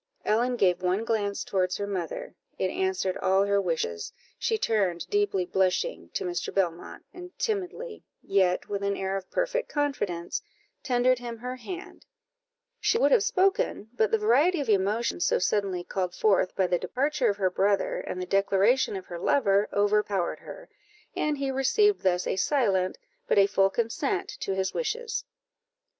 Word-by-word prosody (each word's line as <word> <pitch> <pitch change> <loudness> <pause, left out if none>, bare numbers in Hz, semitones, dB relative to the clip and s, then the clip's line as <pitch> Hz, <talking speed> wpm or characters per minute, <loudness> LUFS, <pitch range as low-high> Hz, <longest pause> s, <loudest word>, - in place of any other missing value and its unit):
Ellen 240 +4 +2
gave 185 -6 +2
one 185 +4 0
glance 205 -3 -1
towards 185 -2 0
her 200 - -2
mother 200 - -4 0.2
it - - 0
answered 375 - -1
all 190 +1 +3
her 200 0 +2
wishes; 160 - -2 0.3
she 445 - +1
turned, 195 - 0
deeply 410 - +1
blushing, 190 - 0
to 435 - -1
Mr. 355 0 -3
Belmont, 175 -3 -2
and 360 0 -11
timidly, 435 +2 -3 0.2
yet 190 -2 +1
with 200 -1 -3
an 200 0 -1
air 190 0 -2
of 190 -1 -5
perfect - - -1
confidence, 205 - -2 0.4
tendered 250 0 +2
him 240 -1 -6
her 250 +2 -5
hand; 360 +9 -9 0.7
she 455 - +2
would 475 - +3
have - - +6
spoken, 390 - +1
but 220 -3 +2
the 225 - +3
variety 275 - +3
of 280 - -3
emotion 210 +2 +1
so - - +2
suddenly 190 -2 0
called 180 -1 -3
forth 195 -3 +2
by 190 - +2
the 180 -1 +1
departure 260 - 0
of 200 - -1
her 190 -2 +1
brother, 200 +2 +1
and 185 - -5
the 180 - -3
declaration 200 +6 +2
of 190 - -6
her 175 - -7
lover, 200 -2 +2
overpowered 205 -3 +1
her, - - -11 0.5
and 300 -1 0
he 275 -1 -1
received 390 - +3
thus 180 -1 +1
a - - -1
silent, 195 -7 +1 0.3
but - - +2
a 200 - +7
full 195 -1 +3
consent 380 - -1
to 195 - -2
his 190 0 -1
wishes. 470 0 -2
210 Hz, 165 wpm, -27 LUFS, 190-295 Hz, 0.7 s, a